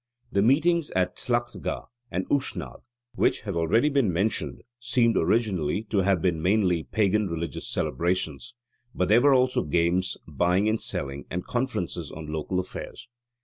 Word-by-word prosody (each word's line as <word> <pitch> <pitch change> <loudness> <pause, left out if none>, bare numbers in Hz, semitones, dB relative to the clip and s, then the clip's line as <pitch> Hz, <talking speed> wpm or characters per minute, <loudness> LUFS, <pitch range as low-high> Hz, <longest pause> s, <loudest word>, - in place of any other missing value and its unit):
The 100 - +2
meetings 155 +8 +3
at 90 -1 +1
Tlachtga 120 -1 -2 0.2
and 90 -2 -3
Ushnagh, 90 - -2 0.3
which - - +1
have 100 -4 -4
already 85 - +3
been 140 -9 +2
mentioned, 100 +6 -1 0.2
seem 120 -1 +2
originally 95 -2 +1
to 105 - +2
have 95 -3 +2
been 85 -4 +1
mainly 90 -2 +2
pagan 105 +3 +1
religious 85 -1 -4
celebrations: 85 - -2 0.4
but 90 0 0
there 115 +3 +6
were 140 0 +5
also 125 0 +3
games, 85 +5 +1
buying 90 +6 +1
and 110 +1 +1
selling, 70 0 -3
and 90 +1 -4
conferences 90 - -2
on 75 -1 -7
local 80 +4 -1
affairs. 95 - -7
95 Hz, 145 wpm, -26 LUFS, 85-115 Hz, 0.4 s, there